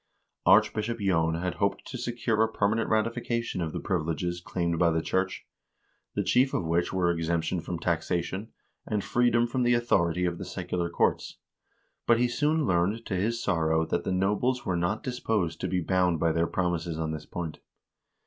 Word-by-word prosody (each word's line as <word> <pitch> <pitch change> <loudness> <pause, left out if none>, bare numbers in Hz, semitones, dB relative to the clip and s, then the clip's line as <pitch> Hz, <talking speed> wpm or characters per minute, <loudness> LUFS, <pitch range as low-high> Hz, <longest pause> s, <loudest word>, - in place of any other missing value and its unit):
Archbishop 115 +2 +4
J6n 80 -5 +1
had 90 - -1
hoped 100 0 0
to 130 - -8
secure 120 -2 -1
a 110 0 +2
permanent 110 +2 +1
ratification 115 -1 -1
of 80 -2 -2
the - - -4
privileges 85 -1 -2
claimed 85 -2 -2
by 85 - +4
the 80 0 +1
church, 95 0 -1 0.7
the - - +1
chief 130 +2 +3
of 85 - -1
which 85 +2 +1
were 90 -2 +2
exemption 85 +1 -1
from 85 +1 -4
taxation, 85 +4 -2 0.4
and 105 -2 -1
freedom 120 -1 +3
from 125 +2 -2
the 120 0 +4
authority 90 -7 +2
of 85 -1 -2
the - - -4
secular 85 -1 -3
courts; 85 - 0 0.7
but 115 - +5
he 125 +1 +3
soon 150 +5 +1
learned 95 +5 +1
to - - -4
his 115 +5 -1
sorrow 80 -4 +1
that - - -1
the - - -2
nobles 105 +7 +1
were 95 -4 0
not 85 +5 -1
disposed 110 -8 -1
to 95 - -1
be 90 0 0
bound 90 -1 +1
by 85 +1 +2
their 85 +1 +1
promises 85 -3 -1
on 80 -1 -2
this 75 -1 -6
point. 85 -3 -5
95 Hz, 180 wpm, -28 LUFS, 85-115 Hz, 0.7 s, but